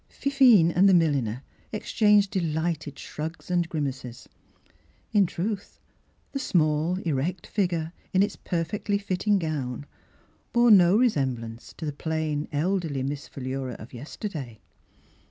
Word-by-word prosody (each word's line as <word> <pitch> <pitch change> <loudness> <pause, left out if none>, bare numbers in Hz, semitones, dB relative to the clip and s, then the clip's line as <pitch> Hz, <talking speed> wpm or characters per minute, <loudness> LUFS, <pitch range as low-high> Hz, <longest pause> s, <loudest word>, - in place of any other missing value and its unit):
Fifine 250 -11 +5
and 190 +4 +5
the 190 - +6
milliner 140 -7 +1 0.3
ex 215 - -5
changed 210 -2 +4
delighted 160 -5 -2
shrugs 160 +4 -6
and 175 -1 +1
grimaces. 135 -5 -4 0.8
In 205 -4 +4
truth, 200 +4 -4 0.5
the 275 - -3
small, 155 - +1
36 - - -4
Miss 190 - -8
Philura 135 - 0
erect 180 -1 -4
figure, 170 -5 -1 0.2
in 190 +1 +4
its 205 - -2
perfectly 180 +4 -2
fit 195 -3 -3
ting 205 0 +3
gown, 145 -6 -3 0.7
bore 240 -1 +5
no 185 -1 +7
resem 145 - +2
blance 115 0 -9
to 165 - -5
the 150 - -3
plain, 155 -1 -2
elderly 160 -3 -1
Miss 140 0 -4
Philura 130 -1 -4
of 110 +3 -11
yesterday. 135 - -6
165 Hz, 145 wpm, -26 LUFS, 140-195 Hz, 0.8 s, no